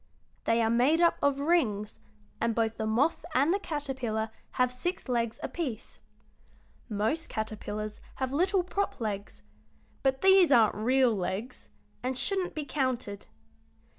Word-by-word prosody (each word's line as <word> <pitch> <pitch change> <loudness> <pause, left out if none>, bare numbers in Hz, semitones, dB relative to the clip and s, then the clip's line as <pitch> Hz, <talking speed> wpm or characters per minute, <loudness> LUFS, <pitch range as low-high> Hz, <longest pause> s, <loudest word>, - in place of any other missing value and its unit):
They 230 0 +3
are 225 - +2
made 255 +8 +4
up 340 -1 +4
of 280 -1 +2
rings, 240 -11 +1 0.4
and 230 -1 0
both 225 -1 0
the 220 - -2
moth 255 +9 +1
and 285 +7 +4
the 400 - +1
caterpillar 260 - -3 0.2
have 250 0 +2
six 350 +9 -3
legs 235 -2 -1
apiece. 270 -11 -4 0.9
Most 220 +10 0
caterpillars 215 -1 -4
have 260 0 -3
little 370 +5 +2
prop 395 +3 -2
legs, 205 -3 -4 0.6
but 265 -1 +1
these 380 -4 +6
aren't 230 -5 +6
real 250 +3 +3
legs 195 +6 -4 0.3
and 255 0 -2
shouldn't 370 +7 -1
be 305 -2 -3
counted. 255 -7 -2
255 Hz, 135 wpm, -29 LUFS, 220-300 Hz, 0.9 s, these